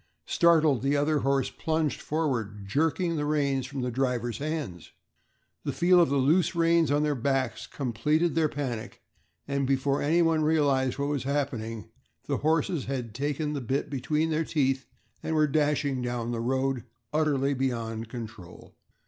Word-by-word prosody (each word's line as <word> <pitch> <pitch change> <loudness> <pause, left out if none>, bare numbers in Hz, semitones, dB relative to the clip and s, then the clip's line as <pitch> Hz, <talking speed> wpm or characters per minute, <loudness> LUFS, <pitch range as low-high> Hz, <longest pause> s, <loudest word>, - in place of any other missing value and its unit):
Startled, 160 - +4
the 140 +2 +1
other 150 +1 +2
horse 135 0 +1
plunged 160 -2 -1
forward, 120 -10 -2
jerking 165 - +1
the 145 - -1
reins 140 -3 0
from 135 0 -5
the 125 0 -2
driver's 120 -1 -1
hands. 145 - -4 0.7
The 140 - -1
feel 175 +7 +4
of 170 - +3
the 140 - +1
loose 160 +7 +3
reins 165 -1 +3
on 145 +1 +2
their 150 -1 +1
backs 135 -1 -1
completed 150 +6 0
their 160 -2 +2
panic, 130 -7 -5 0.4
and 140 -1 0
before 135 +1 +1
anyone 165 +1 +3
realized 145 -4 +2
what 140 0 -1
was 145 -3 -2
happening, 120 -7 -3 0.3
the - - -1
horses 160 0 0
had 125 -5 -4
taken 145 +4 -2
the 140 - -3
bit 130 +5 -2
between 150 +4 0
their 155 +1 +1
teeth 135 -4 0 0.3
and 160 - -2
were 155 -1 +4
dashing 145 -2 +1
down 120 -1 -2
the 115 -1 -2
road, 130 +1 0 0.3
utterly 145 -3 +2
beyond 115 -4 -2
control. 110 -7 -9
140 Hz, 155 wpm, -28 LUFS, 125-155 Hz, 0.7 s, Startled